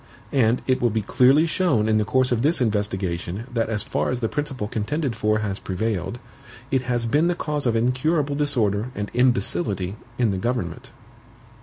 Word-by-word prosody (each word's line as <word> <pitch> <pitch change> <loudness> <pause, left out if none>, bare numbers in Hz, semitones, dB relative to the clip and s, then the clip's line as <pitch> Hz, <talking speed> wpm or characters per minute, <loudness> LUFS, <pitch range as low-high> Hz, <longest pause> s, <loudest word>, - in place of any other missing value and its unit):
And 120 -2 +2
it 130 -1 +1
will 120 - +3
be 110 -1 -1
clearly 135 +9 +4
shown 155 - +1
in 110 -1 +3
the 105 - +1
course 130 +4 +2
of 120 -2 +1
this 155 +6 +3
investigation 100 -4 -1
that 115 -2 0
as 105 -2 -1
far - - -1
as 125 - -1
the 115 - 0
principle 140 -5 -3
contended 125 +5 -2
for 110 -1 +1
has 100 -3 -3
prevailed, 100 +2 -2 0.5
it 135 -2 +2
has 120 -2 -1
been 150 +8 +2
the 175 - +1
cause 150 -5 -2
of 115 - +1
incurable 140 +6 +1
disorder 120 -8 +1
and 105 0 -4
imbecility 100 -5 +1 0.2
in 120 -4 +2
the 95 - -2
government. 125 +3 -3
120 Hz, 180 wpm, -23 LUFS, 105-135 Hz, 0.5 s, clearly